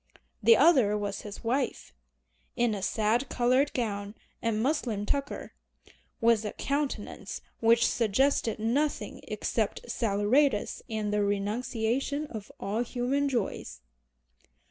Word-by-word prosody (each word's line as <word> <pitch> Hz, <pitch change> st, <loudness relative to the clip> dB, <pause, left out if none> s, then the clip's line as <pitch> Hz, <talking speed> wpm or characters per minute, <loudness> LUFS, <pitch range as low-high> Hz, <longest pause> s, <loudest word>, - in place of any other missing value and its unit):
The 230 Hz, +1 st, +7 dB
other 260 Hz, -9 st, +5 dB
was 200 Hz, -1 st, -3 dB
his 205 Hz, -1 st, -9 dB
wife, 245 Hz, -, -1 dB, 0.6 s
in 240 Hz, -2 st, +2 dB
a 200 Hz, -, -4 dB
sad 220 Hz, +6 st, +1 dB
colored 255 Hz, +4 st, +2 dB
gown 205 Hz, -3 st, -3 dB, 0.3 s
and 230 Hz, -2 st, 0 dB
muslin 240 Hz, -8 st, 0 dB
tucker, 280 Hz, +5 st, -3 dB, 0.7 s
with 230 Hz, -1 st, +4 dB
a 210 Hz, -, -4 dB
countenance 280 Hz, +1 st, -3 dB, 0.2 s
which 230 Hz, +1 st, +5 dB
suggested 230 Hz, +1 st, +1 dB
nothing 255 Hz, +7 st, -1 dB
except 480 Hz, -, -2 dB
saleratus 215 Hz, +3 st, +1 dB
and 215 Hz, -2 st, -2 dB
the 210 Hz, 0 st, +2 dB
renunciation 225 Hz, +7 st, -1 dB
of 215 Hz, -3 st, -7 dB
all 205 Hz, +4 st, -1 dB
human 260 Hz, +4 st, 0 dB
joys. 230 Hz, -, -3 dB
230 Hz, 115 wpm, -29 LUFS, 210-265 Hz, 0.7 s, The